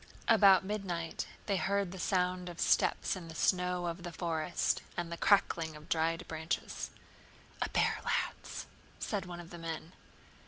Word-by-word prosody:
About 200 -5 +7
midnight 185 -5 -3 0.2
they 200 -2 +1
heard 200 -1 +1
the 190 - -7
sound 180 0 +1
of 175 - -9
steps - - +3
in 180 -3 -7
the 165 - -9
snow 180 -1 +2
of 170 +1 -3
the 175 0 -5
forest, 165 -1 0 0.2
and 175 -1 -2
the - - -2
crackling 165 -4 +3
of 150 0 -12
dry 165 0 +2
branches. 160 -1 -3 0.7
"A - - +1
bear, - - +2
lads," - - -2 0.3
said 195 -4 -2
one 175 -1 -6
of 175 0 -10
the 175 - -8
men. 165 +1 -5
175 Hz, 160 wpm, -33 LUFS, 165-185 Hz, 0.7 s, About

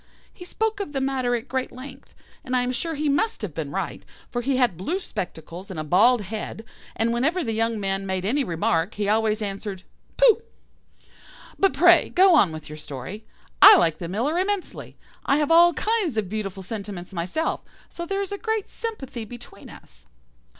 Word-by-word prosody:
He 355 - -11
spoke 440 +3 -2
of 385 -7 -5
the 270 - -1
matter 265 -2 0
at 240 +2 -5
great 260 0 -2
length, 265 +1 -12 0.3
and 255 - -2
I 250 - +3
am 250 - -1
sure 325 +6 -3
he 300 +1 -1
must 285 - 0
have 190 -7 -4
been 150 -2 -4
right, - - -4 0.3
for 240 - -2
he 265 +1 0
had 245 -8 +2
blue 305 - -2
spectacles 175 - -7
and 185 -4 -6
a - - -2
bald 215 +10 +4
head, 215 +2 -6 0.3
and 230 +1 +1
whenever 315 +9 +1
the 225 -4 -2
young 225 0 0
man 195 0 -2
made 190 -1 -2
any 275 +7 +1
remark, 165 -1 0
he 205 -1 -2
always 215 0 +1
answered 195 -1 -5 0.3
'Pooh!' 470 -3 +5 1.2
But 390 - +3
pray - - +5
go 375 0 +5
on 205 - +5
with 155 -1 -8
your 155 0 -9
story. 150 - -8 0.3
I 410 +1 +11
like 165 - +2
the 170 - -5
Miller 245 - -1
immensely. 390 0 -3 0.3
I 275 - +2
have 300 +1 0
all 340 +1 +7
kinds 420 - 0
of 210 -3 0
beautiful 195 -2 -4
sentiments 200 -3 -7
myself, 185 - -2 0.3
so 340 0 -7
there 395 +1 -1
is 390 - -7
a 405 - -4
great 440 -2 -2
sympathy 280 - -6
between 240 +2 -12
us." - - -16
235 Hz, 190 wpm, -24 LUFS, 195-320 Hz, 1.2 s, I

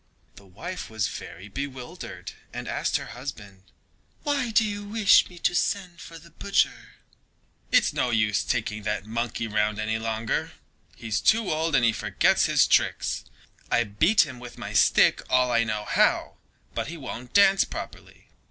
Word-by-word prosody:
The 100 - -16
wife 170 - -7
was 110 -4 -1
very 95 +4 -9
bewildered 130 +2 -7 0.2
and - - -6
asked - - 0
her - - -7
husband: 110 -7 -8 0.6
"Why 280 -4 0
do 225 0 +3
you 205 -1 -4
wish 210 0 +4
me 180 - -14
to 175 - +1
send 180 -1 -1
for 165 - -10
the 165 +1 -16
butcher?" 200 +5 -1 0.8
"It's - - +4
no 125 - 0
use 110 -3 +1
taking 105 0 -2
that 105 -1 -3
monkey 115 +1 -3
round 105 -1 0
any 110 +1 -1
longer, 110 0 -2 0.4
he's 110 -2 -3
too 220 -1 +3
old 160 0 0
and 115 -3 +3
forgets - - +2
his - - +4
tricks. - - +1 0.4
I 120 - +3
beat 155 - +3
him 130 -4 -9
with 120 -1 -10
my - - -7
stick - - +4
all 125 -1 +3
I 115 -1 +3
know 110 -2 -3
how, - - +1 0.4
but - - -3
he 170 - -7
won't 125 -4 -8
dance 195 -1 +6
properly. - - -9
125 Hz, 160 wpm, -26 LUFS, 110-175 Hz, 0.8 s, dance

